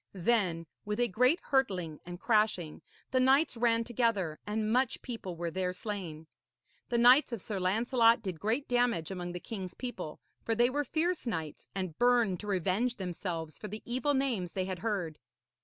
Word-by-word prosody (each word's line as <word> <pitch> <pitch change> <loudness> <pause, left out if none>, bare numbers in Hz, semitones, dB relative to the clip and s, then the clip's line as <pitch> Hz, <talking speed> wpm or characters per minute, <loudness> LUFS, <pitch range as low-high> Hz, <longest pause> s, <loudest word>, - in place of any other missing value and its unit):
Then, 185 -4 +1 0.2
with 210 +2 -3
a 245 - +3
great 250 - +3
hurtling 185 - 0
and 175 0 -7
crashing, 210 -8 +1 0.3
the 255 - +3
knights 270 +3 +4
ran 230 -1 +2
together, 225 -9 0
and 215 +1 0
much 255 0 +1
people 225 -8 -6
were 170 0 -3
there 185 +1 -1
slain. 180 -6 -5 0.6
The 240 - +1
knights 250 +4 +6
of 235 - -3
Sir 200 +1 -4
Lancelot 230 +4 +3
did 185 -5 -4
great 225 - 0
damage 245 -9 +1
among 175 -2 -4
the 180 - -4
king's 185 -3 -6
people, 190 -11 -6 0.2
for 225 - 0
they 240 +2 +3
were 290 +2 0
fierce 325 +2 -1
knights, 160 -9 -4
and 185 -5 -4
burned 240 -7 +3
to 210 - -8
revenge 200 +6 0
themselves 175 -4 -4
for 210 - -6
the 215 +2 -7
evil 260 +4 0
names 240 -10 -1
they 185 -1 -1
had 185 -1 -4
heard. 180 -7 -2
215 Hz, 175 wpm, -31 LUFS, 180-245 Hz, 0.6 s, knights